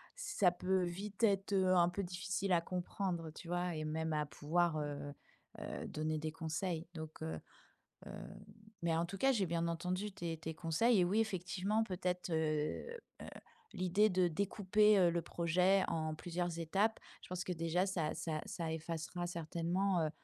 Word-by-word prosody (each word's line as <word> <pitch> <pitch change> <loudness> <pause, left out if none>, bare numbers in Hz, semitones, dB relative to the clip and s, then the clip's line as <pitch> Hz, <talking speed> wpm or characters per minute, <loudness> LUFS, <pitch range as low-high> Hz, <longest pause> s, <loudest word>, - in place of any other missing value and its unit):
ça 210 - +2
peut 185 +1 +1
vite 195 +5 -4
être, 200 -2 +3
heu, 185 -1 +4
un 175 -1 +5
peu 180 +3 -2
difficile 185 +2 -2
à 170 - +4
comprendre, 175 -1 -2
tu 165 - -10
vois? 175 -1 0
Et 155 0 -3
même 160 +1 -1
à 150 0 +1
pouvoir, 165 +3 +1
heu 145 -1 -4 0.5
heu, - - -5
donner 155 0 -1
des 155 0 -3
conseils 160 +1 -3
donc 160 -1 -7
heu 160 - -3 0.7
heu, - - -7 0.7
mais 170 -1 +2
en 165 +1 +1
tout 185 +3 -6
cas, 270 - +4
j'ai 205 -7 +1
bien 170 0 0
entendu 180 +5 -2
tes 170 -3 -3
tes 160 0 -5
conseils 180 +9 +3
et - - +5
oui, 200 +5 +2
effectivement, 195 +1 0
peut-être, 180 -2 -2
heu 155 -1 0 0.4
heu, - - -7 0.5
l'idée 185 +4 +3
de 185 -1 +3
découper, 200 +4 +3
heu, 180 -2 +6
le 170 0 0
projet 180 +4 +3
en 155 -1 -1
plusieurs 175 0 -2
étapes, 195 +7 +1 0.2
je - - -12
pense 180 0 -3
que 185 - -2
déjà 165 +2 +1
ça 170 -6 -1
ça 155 -2 -2
ça 165 -2 -3
effacera 165 +2 -3
certainement, 175 +3 0
heu, 155 - 0
175 Hz, 175 wpm, -36 LUFS, 160-190 Hz, 0.7 s, heu